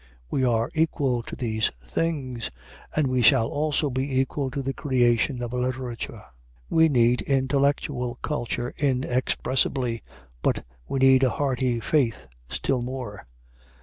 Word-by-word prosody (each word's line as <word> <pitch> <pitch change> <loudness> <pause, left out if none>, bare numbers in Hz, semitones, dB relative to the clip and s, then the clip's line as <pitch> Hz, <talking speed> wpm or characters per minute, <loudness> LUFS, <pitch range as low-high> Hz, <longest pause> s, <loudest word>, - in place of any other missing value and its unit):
We 130 - +1
are 115 -2 +1
equal 145 -6 +1
to - - -8
these 110 -3 0
things; 130 - -2 0.5
and 155 - +3
we 130 -1 +1
shall 115 -1 +5
also 150 -1 0
be 130 +1 0
equal 135 +1 -1
to 135 +2 -4
the 135 +1 -2
creation 125 -2 +1
of 120 0 -4
a - - -1
literature. 125 -2 -3 0.5
We 160 0 +5
need 120 -2 +3
intellectual 135 -2 0
culture 120 -4 -2
inexpressibly, 130 -2 0 0.4
but - - 0 0.2
we - - -2
need 130 0 +6
a 130 - +5
hearty 130 -2 0
faith 115 - +1 0.2
still 130 -2 0
more. 125 -4 -6
130 Hz, 135 wpm, -25 LUFS, 120-140 Hz, 0.5 s, need